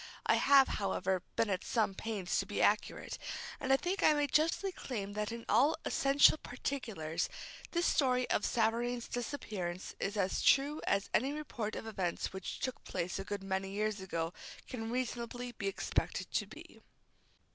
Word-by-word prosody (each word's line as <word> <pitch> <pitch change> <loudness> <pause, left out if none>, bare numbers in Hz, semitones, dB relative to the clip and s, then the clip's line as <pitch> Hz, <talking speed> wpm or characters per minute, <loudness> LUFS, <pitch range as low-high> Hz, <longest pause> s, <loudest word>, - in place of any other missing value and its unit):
I - - +5
have, 275 -1 +6
however, 190 -2 0
been 225 -3 +2
at 185 - -1
some 220 -4 +1
pains 200 -3 -2
to - - -2
be - - -3
accurate, - - +1 0.4
and 265 -3 -1
I 270 - +7
think 365 +6 -2
I 310 - +6
may 295 0 +2
justly 320 +7 +2
claim 205 - -5
that 210 +1 -2
in 230 0 -6
all 270 +9 +4
essential 280 +2 +5
particulars 225 - -3 0.4
this 345 0 0
story 255 -3 +3
of - - +2
Savareen's 235 +1 +1
disappearance 205 -8 -4
is 205 +2 -2
as 195 -2 +1
true 285 +3 +4
as 200 0 +1
any 270 +5 +2
report 240 -8 -4
of - - -5
events 190 -6 -2
which 190 -1 -5
took 255 - -3
place 175 +2 -3
a - - -3
good 200 0 -4
many 190 0 -2
years 210 0 -1
ago 165 -2 -2 0.3
can 225 -3 -4
reasonably 245 0 -3
be 205 -4 -4
expected 195 - -1
to - - 0
be. - - -13
225 Hz, 170 wpm, -34 LUFS, 195-265 Hz, 0.4 s, I